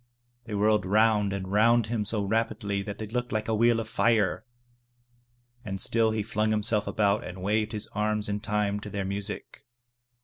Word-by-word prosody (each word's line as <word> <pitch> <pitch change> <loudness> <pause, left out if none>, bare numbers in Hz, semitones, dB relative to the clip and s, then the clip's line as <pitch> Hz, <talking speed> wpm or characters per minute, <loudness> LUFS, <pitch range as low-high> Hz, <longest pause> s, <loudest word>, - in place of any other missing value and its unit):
They 110 -2 -5
whirled 105 0 +3
round 105 +1 +3
and 95 -1 -4
round 115 +2 +4
him 110 -1 -2
so 105 0 -1
rapidly 105 -1 -1
that 100 0 -6
they 110 - -5
looked 125 +3 -3
like 110 0 -2
a 110 - 0
wheel 115 +1 +3
of 115 - -4
fire. 110 -3 +1 1.2
And 95 -3 -5
still 115 +3 +3
he 110 -1 -1
flung 110 0 -1
"himself 105 -1 +1
about 100 -1 +1
and 90 0 -8
waved 105 +2 0
his 105 -2 -3
arms 105 0 0
in 105 0 -2
time 105 -1 -1
to 105 - -8
their 100 -1 -3
music. 100 +2 -5
105 Hz, 180 wpm, -27 LUFS, 100-110 Hz, 1.2 s, round